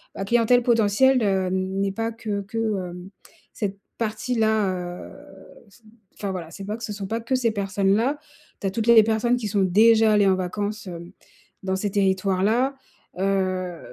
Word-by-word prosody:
la - - -4
clientèle 240 +3 +3
potentielle, 235 +3 +3
hem, 190 -3 0 0.3
n'est 200 0 0
pas 225 +3 -3
que 215 -3 -4
que, 200 +4 -8
heu, 195 -6 -2 0.5
cette 200 -2 -4 0.2
partie-là, 220 -2 0
heu, 180 -1 -7 1.0
enfin, 200 -2 -4
voilà, 175 -4 -6
c'est 195 +4 -9
pas 210 +3 -4
que 235 - -11
ce 210 - -5
sont 200 -1 -6
pas 225 +3 -2
que 235 +3 -1
ces 240 -3 +1
personnes-là. 200 +6 0 0.4
Tu 195 - -1
as - - -1
toutes 225 +3 -3
les 235 - +7
les 220 - +8
personnes 225 +2 +1
qui 240 -3 -3
sont 200 -1 +1
déjà 220 +4 +5
allées 205 -1 +4
en 190 - +4
vacances, 205 +3 -4
heu, 170 0 -8 0.5
dans 190 0 -1
ces 200 +1 -2
territoires-là, 200 +6 +1 0.4
heu, 185 -2 -1
205 Hz, 170 wpm, -23 LUFS, 190-225 Hz, 1.0 s, les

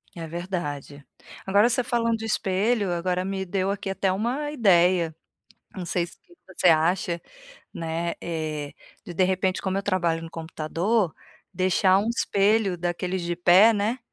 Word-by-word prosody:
É 165 -2 -6
verdade. 155 -5 -5 0.4
Agora 205 +4 +4
você 250 +1 +1
falando 230 -2 0
de 220 - -6
espelho, 205 0 0
agora 180 +1 -1
me 190 0 -3
deu 190 +1 -1
aqui 200 -1 -3
até 195 0 0
uma 245 +10 -2
ideia. 180 - +3 0.6
Não 185 - -5
sei 170 0 0
se - - -15 0.3
você 190 -1 0
acha, 170 +1 +2 0.5
né, 165 +1 -3
eh, 155 -3 -4 0.3
de 175 - -7
de 185 - +2
repente 185 0 0
como 190 0 -1
eu 200 - -2
trabalho 175 -4 0
no 165 - -8
computador, 165 +5 -1 0.4
deixar 185 +1 +3
um 215 +3 -1
espelho 205 -3 +1
daqueles 180 +2 -2
de 170 0 -2
pé, 185 +6 +6
né, 215 +4 -1
185 Hz, 155 wpm, -25 LUFS, 170-200 Hz, 0.6 s, pé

